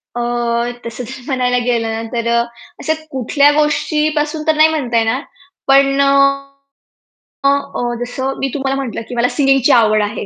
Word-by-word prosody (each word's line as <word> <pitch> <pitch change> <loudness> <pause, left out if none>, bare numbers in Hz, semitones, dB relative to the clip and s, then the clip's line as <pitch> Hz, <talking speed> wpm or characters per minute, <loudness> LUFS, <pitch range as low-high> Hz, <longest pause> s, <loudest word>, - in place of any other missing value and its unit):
अ, 240 - -2 0.6
तसं 235 +2 -6
तर 255 +2 -9
म्हणायला 250 -2 0
गेलं 230 -2 0
ना, 225 0 -3
तर 235 -1 -2
अ, - - +3 0.4
अशा 315 - 0 0.2
कुठल्या 280 +3 +3
गोष्टीपासून 300 0 0
तर 315 - +3
नाही 310 +1 +6
म्हणता 255 -7 -1
येणार 225 +4 +1 0.5
पण 275 0 +4
अ, 280 - +3 1.4
अ, - - +6 0.3
अ, 240 0 -1
जसं 265 +2 -3
मी 270 - -1
तुम्हाला 270 -1 -1
म्हटलं 235 -3 -5
की 245 - -6
मला 240 +1 +1
सिंगिंगची 270 -1 +3
आवड 215 -3 +4
आहे. 205 0 -4
265 Hz, 165 wpm, -16 LUFS, 240-285 Hz, 1.4 s, नाही